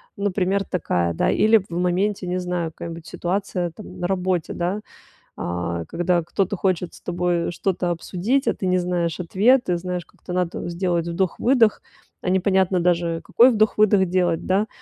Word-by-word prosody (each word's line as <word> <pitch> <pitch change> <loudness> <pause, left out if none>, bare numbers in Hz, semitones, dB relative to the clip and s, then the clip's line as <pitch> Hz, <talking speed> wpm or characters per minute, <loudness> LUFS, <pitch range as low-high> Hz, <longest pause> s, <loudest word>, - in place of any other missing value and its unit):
например, 200 -1 0
такая, 90 - -1
да, - - +1
или 220 +1 +5
в 195 -2 -5
моменте, 185 +3 0
не 180 +1 -1
знаю, 180 -2 -2
какая-нибудь 165 0 -8
ситуация 180 -1 -2
там 215 - -11
на 175 - -1
работе, 185 -2 -1
да, 180 +4 -2 0.6
а, 85 -1 -3
когда 175 - 0
кто-то 185 +4 -1
хочет 180 -2 -1
с - - -14
тобой 175 -1 -1
что-то 180 0 -1
обсудить, 200 - -1
а - - +3
ты 190 - -4
не 185 0 +3
знаешь 175 -2 -1
ответы, 195 +3 +3
знаешь, 180 0 -4
как-то 180 - -10
надо 180 -1 -2
сделать 170 -1 -1
вдох-выдох, 210 +7 +2 0.4
а - - -2
непонятно 190 -1 +2
даже, 170 -1 +1
какой 240 +8 +5
вдох-выдох 215 -3 +3
делать, 175 -2 0
да, 195 +3 +1
180 Hz, 160 wpm, -22 LUFS, 175-195 Hz, 0.6 s, или